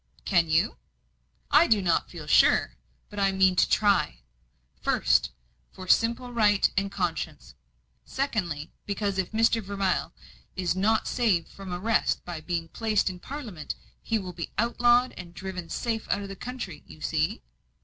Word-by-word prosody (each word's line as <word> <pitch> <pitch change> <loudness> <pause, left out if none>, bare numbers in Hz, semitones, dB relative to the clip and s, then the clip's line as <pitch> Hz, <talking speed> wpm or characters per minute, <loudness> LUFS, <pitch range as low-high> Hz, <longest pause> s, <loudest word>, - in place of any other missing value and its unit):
"Can 170 -4 +3
you?" 160 +1 +2 0.7
"I - - +6
do 220 -2 +4
not 175 -4 +1
feel 165 -4 -9
sure, 150 - +4 0.4
but 205 - -6
I 195 -1 +3
mean 190 -1 +3
to - - +3
try. 200 - +2 0.6
First, - - +2 0.4
for 185 - -10
simple 235 +4 +2
right 210 -3 +4
and 195 +1 0
conscience; 175 -6 -3 0.5
secondly, 175 - -3 0.2
because 200 -1 -1
if 185 - -1
Mr. 225 +1 +3
Vermilye 195 -2 -1 0.5
is 180 -1 0
not 215 +4 +2
saved 210 -10 +1
from 195 -2 -9
arrest 215 +6 0
by 170 -3 -6
being 165 0 -3
placed 215 -2 0
in 180 - -10
Parliament, 225 - -6 0.3
he 225 - 0
will 185 -4 -6
be 170 -1 -6
outlawed 240 +2 +3
and 175 -2 -10
driven 185 -3 -6
safe 225 -2 -2
out 200 - 0
of 200 - -7
the 195 - -6
country. 220 -10 -6
You 155 - -14
see?" 155 - -1
195 Hz, 155 wpm, -27 LUFS, 175-220 Hz, 0.7 s, I